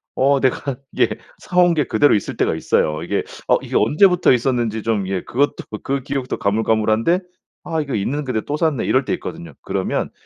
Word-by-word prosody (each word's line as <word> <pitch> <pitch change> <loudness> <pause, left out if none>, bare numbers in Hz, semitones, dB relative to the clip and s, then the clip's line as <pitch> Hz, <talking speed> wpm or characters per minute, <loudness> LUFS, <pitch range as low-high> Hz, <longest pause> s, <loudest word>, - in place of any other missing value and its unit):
어 135 +1 +3
내가 135 0 0 0.2
이게 - - +2 0.3
사 180 - -6
온 175 -1 +5
게 150 -4 +1
그대로 130 +7 +3
있을 105 - -1
때가 - - +1
있어요. 75 0 0
이게 - - -1 0.2
어 - - +5
이게 - - -6
언제부터 180 +1 +4
있었는지 120 -3 0
좀 105 -4 0
예 95 -2 -2
그것도 140 +4 0 0.3
그 135 -1 -2
기억도 135 -2 -3
가물가물한데 110 - +1 0.4
'아 160 -2 -2
이거 140 -5 -3
있는 135 +9 -1
근데 125 -5 -2
또 145 - -4
샀네.' 155 -5 0
이럴 130 0 +2
때 - - -1
있거든요. 170 -1 -6
그러면 95 -1 -2
130 Hz, 385 characters per minute, -20 LUFS, 110-150 Hz, 0.4 s, 온